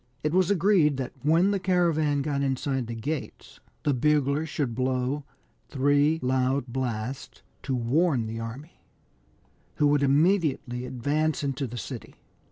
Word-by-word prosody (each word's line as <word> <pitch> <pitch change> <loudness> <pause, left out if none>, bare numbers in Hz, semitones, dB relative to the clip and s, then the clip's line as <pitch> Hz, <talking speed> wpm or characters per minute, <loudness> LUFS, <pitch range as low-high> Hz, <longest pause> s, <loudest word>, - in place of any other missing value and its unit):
It 150 +1 0
was 185 0 +3
agreed 180 -7 +3
that 130 -2 -4
when 165 +7 +3
the 200 - 0
caravan 165 -6 +1
got 140 -1 -1
inside 135 -2 -1
the 115 - -5
gates 145 +7 -6 0.2
the 145 - +2
bugler 145 +3 +1
should 145 -5 -2
blow 130 +3 -1 0.4
three 145 +3 +2
loud 130 +1 +1
blasts 125 0 -4 0.2
to 135 - -2
warn 130 +2 +1
the 115 +1 -5
army, 125 +8 -8 1.0
who 150 - +2
would 145 0 +3
immediately 140 -4 +1
advance 150 +6 -1
into 140 0 -2
the 120 +1 -7
city. 105 - -7
140 Hz, 140 wpm, -26 LUFS, 130-155 Hz, 1.0 s, was